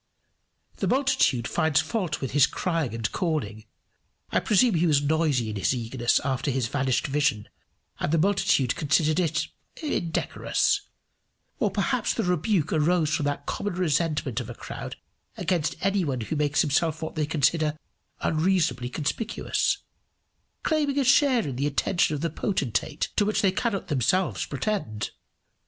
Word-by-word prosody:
] - - -45
The - - -1
multitude 260 - +2
finds 160 -3 +2
fault 170 0 -2
with 135 - -3
his 140 0 +5
crying 165 -10 -2
and 110 -3 -2
calling. 115 - -2 0.7
I - - +3
presume 220 +2 +3
he 170 0 +2
was 150 -3 +4
noisy 145 -7 +1
in 105 - -4
his 100 +7 +1
eagerness 120 0 +1
after 135 0 -1
his 130 -2 0
vanished 130 -1 0
vision, 140 -7 0 0.5
and - - -1
the 165 - +3
multitude 165 -8 +2
considered 155 +1 +2
it 170 -2 0 0.3
indecorous. 310 - 0 0.8
Or 210 - +2
perhaps 215 +4 0
the - - 0
rebuke 180 -1 +1
arose 160 0 +2
from 155 -2 0
that 145 0 -2
common 205 -3 -3
resentment 155 -7 0
of 120 -2 -6
a 120 - -7
crowd - - -7 0.4
against 170 -5 0
any 195 -1 +2
one 135 -6 -2
who 135 +8 -3
makes 145 -1 +2
himself 160 +2 0
what 160 - -4
they 155 -2 -1
consider 155 0 +1 0.4
unreasonably 160 -6 +1
conspicuous, 160 - -1 0.8
claiming 295 -3 +1
a 280 - +3
share 255 - +4
in 130 -3 -4
the 140 +2 0
attention 155 +2 +1
of 145 - -5
the 165 - -1
potentate 150 - -1
to 210 - +4
which 210 +1 0
they 195 - +4
cannot 200 0 -2
themselves 160 +7 +1
pretend. 140 - -3
155 Hz, 155 wpm, -26 LUFS, 140-185 Hz, 0.8 s, his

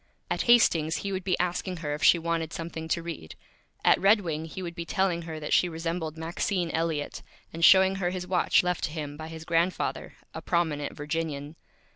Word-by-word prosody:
At - - 0
Hastings 165 -9 +5
he 200 - -2
would 190 -1 -3
be 185 -1 0
asking 180 +1 -1
her 150 -3 -3
if 150 - -5
she - - +7
wanted 165 -1 -2
Something 165 -1 -5
to 165 +1 -1
Read. 160 - -7 0.5
At - - +5
Red 205 +2 +5
Wing 160 -3 -3
he 185 +3 -7
would 170 -1 -5
be 170 -1 -5
telling 180 0 0
her 160 -1 -5
that 150 - -3
she 180 - +4
resembled 165 -1 -4
Maxine 170 +2 -2
Elliott, 160 -3 -2 0.3
and 165 +1 -4
showing 190 +1 +7
her 180 -2 0
his 180 0 -4
Watch, 180 -1 +3
left 180 -1 -1
to - - -4
him 150 -2 -5
by 155 +1 -7
his 160 0 -9
Grandfather, 170 +2 -1 0.2
a - - -6
Prominent 160 -5 -1
Virginian. 150 -1 -4
165 Hz, 200 wpm, -27 LUFS, 160-180 Hz, 0.5 s, she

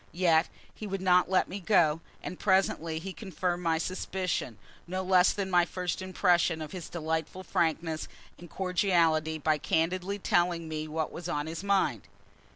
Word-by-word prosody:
Yet 170 -2 +3 0.3
he 215 - -7
would 195 0 -3
not 180 -1 +3
let 190 - +3
me 195 - -6
go; 165 -5 +3 0.2
and 180 - -6
presently 190 -4 +1
he 185 +4 -6
confirmed 180 -3 -3
my 165 -2 +1
suspicion, 185 - -3 0.3
no 185 +2 -3
less 185 0 +5
than 195 -2 -3
my 175 -1 +5
first 180 0 -3
impression 175 -3 +2
of 155 -1 -6
his 180 -4 -7
delightful 160 +2 -3
frankness 160 -2 -1 0.3
and 175 0 -11
cordiality, 170 -4 +1
by 155 0 +1
candidly 180 +6 0
telling 175 -3 +1
me 155 0 -4
what 155 0 -2
was 175 +1 -6
on 145 -3 -1
his 165 +3 -6
mind. 200 -1 +1
175 Hz, 160 wpm, -29 LUFS, 160-185 Hz, 0.3 s, less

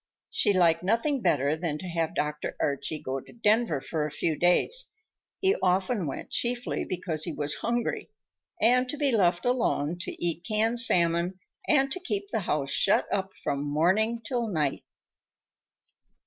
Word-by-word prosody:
She - - +4
liked 170 -4 +3
nothing 230 - 0
better 145 - +2
than 160 -2 -3
to 185 - -7
have 165 -2 -2
Dr. 150 0 -3
Archie 140 +2 -1
go 135 -2 -4
to - - -15
Denver 220 - +2
for 155 +3 -3
a 150 - -2
few 155 +2 -1
days—he 405 - 0
often 185 +1 +1
went 135 - -6
chiefly 245 +1 -1
because 175 -4 -1
he 170 - -3
was 145 0 0
hungry—and 240 +2 -1
to 295 - -3
be 285 -2 +1
left 180 -6 +2
alone 205 - 0
to - - -3
eat 170 0 -1
canned 220 +3 +1
salmon 175 -4 +2 0.3
and 275 -4 +3
to 370 - -3
keep 205 - -3
the 220 - 0
house 140 -2 0
shut - - +3
up 190 -1 -1
from 140 0 -1
morning 175 +10 +2
until 240 -3 -1
night. 155 -8 -1
185 Hz, 155 wpm, -27 LUFS, 155-235 Hz, 0.3 s, She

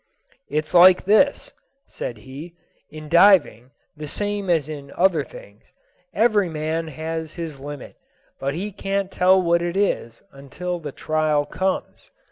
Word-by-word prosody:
"It's 155 +2 -2
like 180 +1 +7
this," 280 - +2 0.3
said 120 - -6
he: 140 +9 -11 0.3
"in 155 0 -10
diving, 170 - +4 0.3
the 150 0 -7
same 205 +3 -3
as 160 -5 +2
in 145 -2 -8
other 175 -4 +2
things, 100 -5 -15 0.5
every 210 -4 +2
man 160 +1 -3
has 160 +1 -5
his 160 -5 -6
limit; 145 0 -9 0.4
but 140 +1 -2
he 200 +5 -4
can't 195 0 -3
tell 185 +1 +4
what 170 -1 +2
it 175 +2 -2
is 120 - -1
until 175 +6 -6
the 150 -3 -7
trial 155 0 0
comes. 190 +5 -3
165 Hz, 140 wpm, -22 LUFS, 145-185 Hz, 0.5 s, like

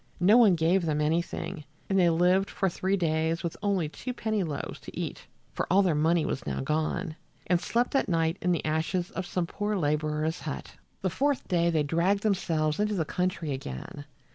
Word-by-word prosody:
No 190 +5 +6
one 220 -7 +7
gave 170 +2 +2
them 150 -1 0
anything, 165 +2 -1 0.2
and 195 -1 +2
they 175 -2 +5
lived 180 +4 +3
for 195 - 0
three 190 +3 0
days 160 0 0
with 170 - -3
only 195 -6 +1
two 250 - -6
penny 220 -3 -1
loaves 155 -5 -4
to - - -9
eat - - -5 0.3
(for - - -2
all 195 +2 +5
their 180 -4 +2
money 160 +2 +2
was - - -2
now - - -2
gone), 155 +3 -1 0.3
and 175 0 +2
slept 240 +4 0
at 270 -6 +1
night 165 0 +1
in 180 - +1
the 170 - 0
ashes 160 +3 -1
of 185 -1 -4
some 180 -2 -1
poor 205 +4 -2
laborer's 155 -1 0
hut. 65 - -6 0.3
The 185 - +1
fourth 280 - 0
day 170 -1 +2
they 160 -3 +2
dragged 175 +7 +1
themselves 160 -7 0
into 210 0 +1
the 165 -4 0
country 180 -3 -2
again. 135 - -6
170 Hz, 195 wpm, -28 LUFS, 155-195 Hz, 0.3 s, one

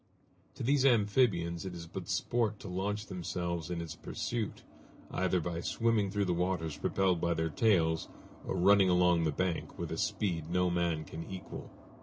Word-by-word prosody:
To - - -5
these 135 +2 +3
amphibians 105 -8 +3
it 95 -2 -5
is 85 -1 -7
but 85 - -7
sport 110 -3 0
to - - -8
launch 100 +3 -2
themselves 85 -2 -3
in 90 -1 -2
its 85 -2 -5
pursuit, 115 -4 -4 0.5
either 95 -1 +1
by 85 0 -3
swimming 115 0 +1
through 100 +1 0
the 90 - +1
waters 85 -3 -1
propelled 95 -3 +1
by 85 -1 +1
their 80 0 -1
tails 80 -6 +2 0.3
or - - -3
running 95 +1 +5
along 90 -2 +4
the 80 - +2
bank 90 +2 -2
with - - -4
a - - -2
speed 85 -6 -1
no 90 0 +2
man 85 -3 0
can 80 +2 -7
equal. 95 -1 -7
90 Hz, 175 wpm, -32 LUFS, 85-100 Hz, 0.5 s, running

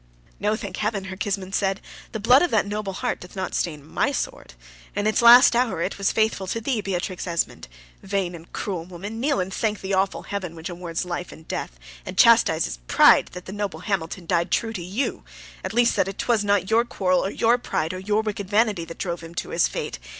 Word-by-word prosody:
"No; 210 +2 +1
thank 200 -4 -6
heaven!" 210 -2 -1
her 190 0 -6
kinsman 195 -1 -3
said. 195 0 0 0.3
"The 220 - -4
blood 250 +6 +6
of 355 - +2
that 220 -6 +2
noble 205 -1 -3
heart - - -2
doth 180 - -12
not 190 -1 -3
stain 150 -4 -2
my 155 - 0
sword! - - -4 0.4
In 205 - -1
its 215 +2 +2
last 235 +1 +9
hour 240 -7 +1
it 200 - -3
was 195 - +2
faithful 220 -3 0
to 230 - -2
thee, 230 -1 -1
Beatrix 185 -1 -3
Esmond. 170 - -2 0.3
Vain 195 -2 -2
and 165 0 -12
cruel 185 -5 -3
woman! 190 +5 -7
kneel 280 +1 +1
and 185 +1 -2
thank 215 -2 -1
the 195 +1 -3
awful 190 +1 0
heaven 190 -5 -5
which 160 +2 -6
awards 175 0 -4
life 175 0 -4
and 160 - -14
death, - - -4 0.3
and - - -8
chastises - - +4
pride, - - +6
that 180 0 -8
the 190 - -7
noble 200 -6 -4
Hamilton 180 -2 -3
died 170 +1 +1
true 225 -1 0
to 190 - -5
you; 195 +10 -3 0.4
at - - -3
least 235 +1 +3
that 195 +1 0
'twas 230 -4 +1
not 200 -1 +1
your 230 +1 +5
quarrel, 185 -6 +1
or - - -1
your 235 +4 +2
pride, 160 -7 -2
or 185 - -5
your 210 +3 0
wicked 205 -3 -4
vanity, 205 -5 +2
that 165 - -9
drove 175 -2 -3
him 165 0 -11
to - - -4
his - - +2
fate. - - -5
195 Hz, 220 wpm, -24 LUFS, 180-215 Hz, 0.4 s, last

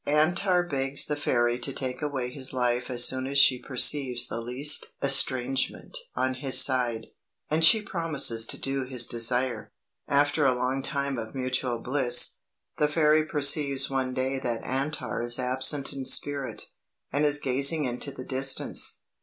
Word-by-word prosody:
Antar 175 +5 +1
begs 140 -4 -2
the 150 - -3
fairy 120 -4 -1
to 130 +3 -2
take 130 0 -5
away 135 -4 -4
his 130 0 -7
life 125 -1 -2
as 120 -1 +3
soon 130 0 -3
as 140 +1 -3
she 130 -2 +3
perceives 130 -1 +1
the 115 - -6
least 125 +5 +1
estrangement 135 - 0 0.2
on 130 0 -1
his 130 0 +4
side, 125 -4 +2 0.5
and 160 +1 0
she 210 +7 +5
promises 150 - 0
to - - -4
do 135 0 -4
his 125 -2 0
desire. 120 +2 -1 0.4
"After 145 +2 +1
a 130 -2 +2
long 130 +2 -2
time 140 -2 -4
of 110 +3 -9
mutual 130 -1 -2
bliss, 125 0 +2 0.4
the 150 - +1
fairy 155 0 +2
perceives 140 -2 +3
one 130 -1 -2
day 130 +1 -2
that 120 -3 -4
Antar 135 0 -4
is 120 0 -1
absent 130 +2 +2
in 135 - -6
spirit, 140 0 +1 0.5
and 145 - 0
is 145 -1 +2
gazing 140 +3 +2
into 125 +3 -3
the 130 - -10
distance. 135 +1 +1
135 Hz, 160 wpm, -26 LUFS, 125-145 Hz, 0.5 s, she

